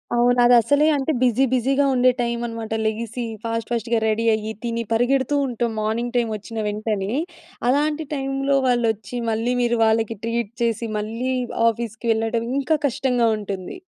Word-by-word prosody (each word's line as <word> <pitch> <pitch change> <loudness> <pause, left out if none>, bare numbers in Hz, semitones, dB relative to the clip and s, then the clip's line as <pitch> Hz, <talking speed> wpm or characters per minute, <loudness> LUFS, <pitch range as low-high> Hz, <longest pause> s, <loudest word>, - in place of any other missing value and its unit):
అవును. 245 +1 +3
అదసలే 245 +5 +5
అంటే, 275 +3 0
బిజీ 250 +1 +3
బిజీగా 270 +3 +2
ఉండే 255 +1 +5
టైమనమాట. 235 -2 -3
లెగిసీ 230 +2 -2 0.2
ఫాస్ట్ 230 -1 -3
ఫాస్ట్‌గా 235 0 0
రెడీ 220 +1 0
అయ్యి, 215 0 -4
తిని 230 0 -2
పరిగెడుతూ 260 +4 +2
ఉంటాం. 240 -2 -2
మార్నింగ్ 235 +3 -2
టైమొచ్చిన 225 -1 -2
వెంటనే. 210 -1 -2 0.6
అలాంటి 300 +3 +1
టైములో 275 0 0
వాళ్ళొచ్చి, 230 -2 0
మళ్ళీ 225 +3 0
మీరు 240 -1 +1
వాళ్ళకి 225 0 +1
ట్రీట్ 230 -2 -2
చేసి, 230 0 0
మళ్ళీ 230 +5 -3 0.4
ఆఫీస్‌కి 230 0 -5
వెళ్ళడం, 225 +1 -1
ఇంకా 310 +3 +1
కష్టంగా 250 -3 +1
ఉంటుంది. 200 - -6
235 Hz, 140 wpm, -22 LUFS, 225-250 Hz, 0.6 s, అదసలే